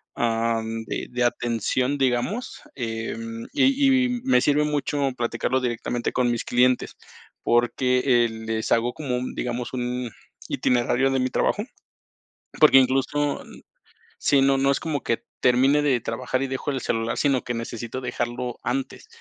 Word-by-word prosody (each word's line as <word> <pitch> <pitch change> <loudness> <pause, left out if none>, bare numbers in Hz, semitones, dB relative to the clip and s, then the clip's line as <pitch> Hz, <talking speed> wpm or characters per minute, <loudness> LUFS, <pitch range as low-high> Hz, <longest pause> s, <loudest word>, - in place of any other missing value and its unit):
am, 115 -1 -1
de - - -4
de 125 0 0
atención, 120 +3 0
digamos, 135 - -1
em, 115 -1 -5
y 270 -2 +4
y 245 -1 -3
me 260 - +4
sirve 150 +1 +3
mucho 145 -2 0
platicarlo 120 +2 -1
directamente 120 -1 -2
con 125 -2 +2
mis 120 - -2
clientes, 125 +1 +2 0.5
porque, 125 +2 +2 0.2
eh, 115 - -1
les 110 0 -4
hago 120 +1 +2
como, 135 -5 -3
un 125 - -4
digamos, 120 +1 -3
un 125 -1 -3 0.4
itinerario 125 +2 +1
de 135 - +1
mi 130 0 0
trabajo, - - 0 1.0
porque 135 - +8
incluso, 135 +3 +1 0.8
sí, 140 -1 +3
no 135 0 +4
no 135 +1 +3
es - - 0
como 150 -4 -2
que 115 - -1 0.2
termine 135 +4 +4
de 135 -4 +2
trabajar 125 +3 -2
y - - -1
dejo 135 +2 -3
el 130 -2 -3
celular, 115 0 -1
sino 140 -4 +2
que 120 - -3
necesito 115 +2 -5
dejarlo 120 0 -3
antes, 135 - -3
125 Hz, 150 wpm, -24 LUFS, 120-135 Hz, 1.0 s, porque